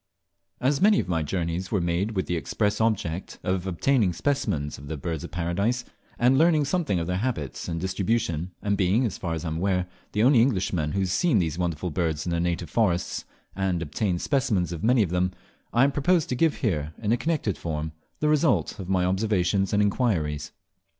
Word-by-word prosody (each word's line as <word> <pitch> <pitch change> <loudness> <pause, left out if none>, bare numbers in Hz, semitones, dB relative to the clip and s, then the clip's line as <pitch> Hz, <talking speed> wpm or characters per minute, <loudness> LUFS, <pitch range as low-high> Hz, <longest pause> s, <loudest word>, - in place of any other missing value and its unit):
AS 135 +2 +1
many 210 +1 +5
of - - -2
my 85 -3 0
journeys 85 +3 -2
were 105 - +2
made 90 +5 -1
with 95 - 0
the 90 - -1
express 105 +6 -1
object 95 -6 -1
of 95 0 -1
obtaining 100 +2 +2
specimens 90 - -1
of 70 - -10
the 80 +1 -4
Birds 80 0 -4
of - - -6
Paradise, 100 +8 -1 0.3
and 125 +3 +4
learning 160 -2 +4
something 145 - 0
of 85 - -1
their 90 +1 -1
habits 100 - -3
and 85 -1 -2
distribution; 95 -2 -1
and 100 0 +1
being 100 +6 +2
(as 110 - -3
far 85 -2 -2
as 80 +1 -5
I - - -1
am 80 - -3
aware) 90 0 +1 0.3
the 105 - +2
only 125 -2 +6
Englishman 95 - +1
who 100 - 0
has 95 -2 0
seen 165 - +3
these 80 -3 0
wonderful 85 0 -2
birds 80 -2 -1
in 85 - -2
their 85 - 0
native 85 -1 -2
forests, 95 -7 0 0.3
and 95 -2 0
obtained 85 +3 -2
specimens 125 - +1
of 85 -2 -5
many 120 0 +4
of 90 - -3
them, 90 +1 +1 0.4
I 120 +3 +4
propose 150 +4 +2
to 125 - -2
give 160 +3 +2
here, 80 - -1
in 110 -1 -1
a - - +5
connected 150 - -1
form, 80 -1 -4 0.3
the 150 - +2
result 150 -6 +2
of 95 -1 -6
my 90 -2 +2
observations 95 0 +1
and 105 0 +3
inquiries. 95 - 0
95 Hz, 205 wpm, -26 LUFS, 85-115 Hz, 0.4 s, only